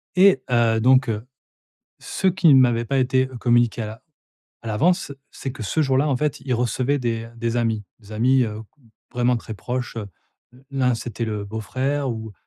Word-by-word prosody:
Et 185 -7 +5
heu, 115 -2 +3
donc, 130 +1 +4
heu, 110 +2 -3 0.7
ce 190 - -2
qui 185 -1 +3
ne 130 - +7
m'avait 120 -2 +3
pas 135 - -1
été 130 0 +2
communiqué 120 -1 +2
à 110 - -3
l'a 110 +1 -9 0.6
à - - -12
l'avance, 150 - +1 0.2
c'est 135 - -6
que 120 - -8
ce 155 +10 0
jour-là, 135 +1 +2
en 135 - +1
fait, 150 +1 -1
il 130 -2 -2
recevaient 125 +4 0
des 115 -2 -3
des 115 0 -2
amis 110 -3 -1
des 110 -1 -14
amis, 125 +4 +3
heu, 110 0 -5 0.2
g 125 - -27 0.3
vraiment 125 0 +2
très 115 - -7
proches, 125 +3 -4
heu. 105 - -5 0.6
L'un, 130 -2 +1
c'était 115 0 -4
le 105 -2 -3
beau-frère 130 +7 -2
ou 110 -2 -6
120 Hz, 190 wpm, -22 LUFS, 115-135 Hz, 0.7 s, ne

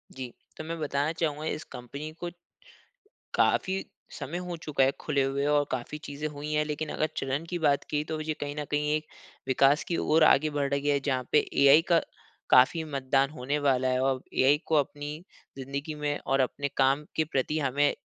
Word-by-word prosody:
जी। 130 -2 -6 0.3
तो - - -5
मैं 165 +1 -5
बताना 145 0 0
चाहूँगा, 155 -1 -1
इस 155 -1 -3
कंपनी 140 +6 -7
को 175 - -3 1.1
काफ़ी 190 0 +2 0.3
समय 170 +6 -5
हो 180 -1 -4
चुका 150 -4 0
है, 135 - +4
खुले 140 -3 +1
हुए 140 +1 -1
और 145 0 +3
काफ़ी 130 +4 -3
चीज़ें 145 +2 -4
हुई 150 +1 -6
हैं। 150 0 +2
लेकिन 150 0 -3
अगर 155 - 0
चलन 135 +4 -2
की 175 -1 -2
बात 145 -3 +2
की, 150 -1 0
तो 155 0 -4
ये 155 0 -2
कहीं 145 0 -3
न 150 - -3
कहीं 150 0 +1
एक 155 0 -3 0.4
विकास 135 +3 +4
की 170 - -2
ओर 155 +1 +3
आगे 155 +1 +5
बढ़ 140 -1 +1
रही 140 +1 -1
है, 140 -1 +3
जहाँ 130 -3 -2
पे 150 - +6 0.2
एआई 140 +3 +8
का 170 - +6 0.5
काफ़ी 130 +6 +5
मतदान 135 -2 +1
होने 145 0 -2
वाला 130 -1 +3
है 130 0 +1
औ 135 -1 +2 0.2
एआई 140 +3 +4
को 160 - +2
अपनी 145 +1 -1 0.4
ज़िंदगी 140 +3 -5
में 145 -1 -1
और 135 0 +2
अपने 140 +2 0
काम 135 +2 +3
के 160 - +2
प्रति 150 +4 0
हमें 145 +1 +2
145 Hz, 200 wpm, -28 LUFS, 135-155 Hz, 1.1 s, एआई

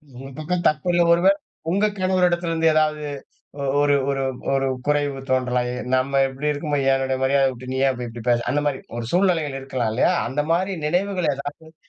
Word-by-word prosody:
உங்க 135 +2 -9
பக்கம் 175 +3 -2
தப்பு 150 +3 0
இல்ல 175 - +3
பொழுது, 170 +3 +5 0.4
உங்க 200 +4 +2
கணவர் 185 -1 +3
இடத்திலிருந்து 165 -2 0
ஏதாவது 155 -1 +1 0.8
ஒரு 145 0 +3 0.2
ஒரு 135 -1 -1 0.3
ஒரு 135 0 +1 0.2
குறைவு 145 -2 0
தோன்றலாம். 125 -1 +1
எ - - -4 0.2
நம்ம 135 +2 +1
எப்படி 135 +3 -3
இருக்கும்போது, 145 -2 -1
என்னுடைய 130 0 0
மரியாதை 135 0 +3
விட்டு 125 +1 -8
நீ - - -2
அப்படி 125 -1 -5
இப்படி 115 0 -9
பேசுற 120 0 +2
அந்த 145 +1 0
மாரி 135 -2 -1 0.2
ஒரு 120 - -4
சூழ்நிலைகள் 170 -7 +1
இருக்கலாம். 130 -4 -2
இல்லையா? 130 +9 +3 0.2
அந்த 145 +3 -1
மாரி 185 +3 +1
நினைவுகள் 180 -1 0
ஏதாச்சும் 145 +3 -8
145 Hz, 175 wpm, -22 LUFS, 130-170 Hz, 0.8 s, பொழுது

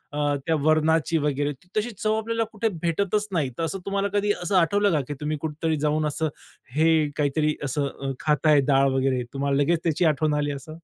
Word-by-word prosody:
अ, 145 -1 +1
त्या 165 -1 +2
वरणाची 155 +1 +2
वगैरे 145 -1 0 0.3
तशी 220 +3 0
चव 215 0 0
आपल्याला 230 +1 -1
कुठे 220 +1 0
भेटतच 200 +5 0
नाही. 150 -7 0
तर 165 - -2
असं 195 +4 -2
तुम्हाला 200 0 0
कधी 205 0 +2
असं 195 +2 -1
आठवलं 200 +3 +3
का, 150 -3 +2
की 145 - -4
तुम्ही 150 0 -2
कुठेतरी 160 0 -2
जाऊन 155 +1 +1
असं 160 +2 -1 0.5
हे 160 +1 +4 0.3
काहीतरी 150 +1 +1
असं 140 +1 -1
अ, 135 0 -5
खाताय 150 -1 +3
डाळ 135 -1 +4
वगैरे, 130 -2 +1
तुम्हाला 140 0 0
लगेच 170 +2 +1
त्याची 165 +1 +1
आठवण 155 -1 +2
आली 145 0 -1
असं? 140 +2 -8
155 Hz, 195 wpm, -25 LUFS, 145-175 Hz, 0.5 s, हे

